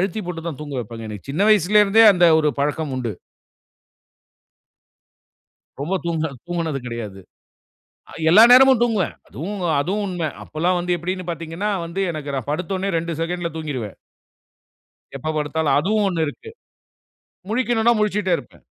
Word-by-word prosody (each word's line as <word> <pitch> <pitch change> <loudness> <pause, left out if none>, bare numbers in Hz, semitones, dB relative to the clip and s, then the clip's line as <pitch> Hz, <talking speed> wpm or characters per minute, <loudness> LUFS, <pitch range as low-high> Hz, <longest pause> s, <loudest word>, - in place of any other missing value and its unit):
அழுத்தி 195 +3 -2
போட்டு 165 -2 -6
தான் 150 -4 -6
தூங்க 145 -2 -6
வைப்பாங்க, 115 0 -8
எனக்கு 105 +4 -9
சின்ன 180 +9 +1
வயசுல 210 +1 +5
இருந்தே 220 +3 +5
அந்த 175 -2 +4
ஒரு 150 -1 +2
பழக்கம் 150 0 -1
உண்டு. 120 -4 -3 2.7
ரொம்ப 160 +7 -2
தூங்க 160 -1 -1 0.2
தூங்கினது 165 -5 -2
கிடையாது. 110 -5 -6 0.9
அ - - -14 0.2
எல்லா 205 +7 +8
நேரமும் 260 -1 +7
தூங்குவேன், 220 -7 0
அதுவும் 190 +9 -6 0.2
அதுவும் 195 +8 -1
உண்மை, 175 -4 -2 0.2
அப்போல்லாம் 175 +4 -1
வந்து 175 0 0
எப்படினு 185 +2 -4
பார்த்தீங்கனா 165 +4 -4 0.2
வந்து 175 +4 -4
எனக்கு 145 -3 -6
நான் 135 +2 -4
படுத்தோனே 185 +4 -2
2 170 +1 -3
செகண்ட்ல 170 0 -3
தூங்கிடுவேன். 130 -10 -5 1.2
எப்போ 145 +4 -4
படுத்தாலும் 150 0 0
அதுவும் 205 +6 +1
1 165 -4 0
இருக்கு. 150 - -8 1.0
முழிக்கனுனா 235 0 +2
முழிச்சிட்டே 210 -3 +1
இருப்பேன். - - -14
170 Hz, 135 wpm, -21 LUFS, 150-195 Hz, 2.7 s, எல்லா